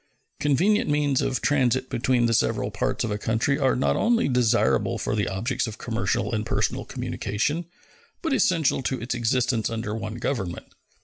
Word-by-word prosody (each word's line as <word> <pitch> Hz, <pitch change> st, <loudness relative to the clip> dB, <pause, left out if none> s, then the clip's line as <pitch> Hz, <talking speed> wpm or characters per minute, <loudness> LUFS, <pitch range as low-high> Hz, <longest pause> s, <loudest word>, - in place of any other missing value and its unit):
Convenient 180 Hz, -, +2 dB
means 145 Hz, -2 st, +2 dB
of 135 Hz, -3 st, -1 dB
transit 130 Hz, -3 st, +2 dB
between 120 Hz, 0 st, +1 dB
the 115 Hz, -, +2 dB
several -, -, +1 dB
parts -, -, -1 dB
of 115 Hz, -, -2 dB
a 105 Hz, -, -2 dB
country 115 Hz, +7 st, 0 dB
are 135 Hz, -2 st, +2 dB
not 70 Hz, 0 st, +1 dB
only 230 Hz, -5 st, +2 dB
desirable 125 Hz, -3 st, +2 dB
for -, -, -2 dB
the 105 Hz, -3 st, 0 dB
objects 115 Hz, +7 st, -1 dB
of 110 Hz, -1 st, -7 dB
commercial -, -, -1 dB
and -, -, 0 dB
personal -, -, -1 dB
communication, 150 Hz, -, -2 dB, 0.6 s
but 325 Hz, -4 st, 0 dB
essential 170 Hz, -, +2 dB
to 130 Hz, 0 st, -2 dB
its 120 Hz, +2 st, -3 dB
existence 120 Hz, -1 st, +1 dB
under 110 Hz, -2 st, -3 dB
one 110 Hz, 0 st, -4 dB
government. 110 Hz, -8 st, -4 dB
125 Hz, 170 wpm, -25 LUFS, 110-145 Hz, 0.6 s, Convenient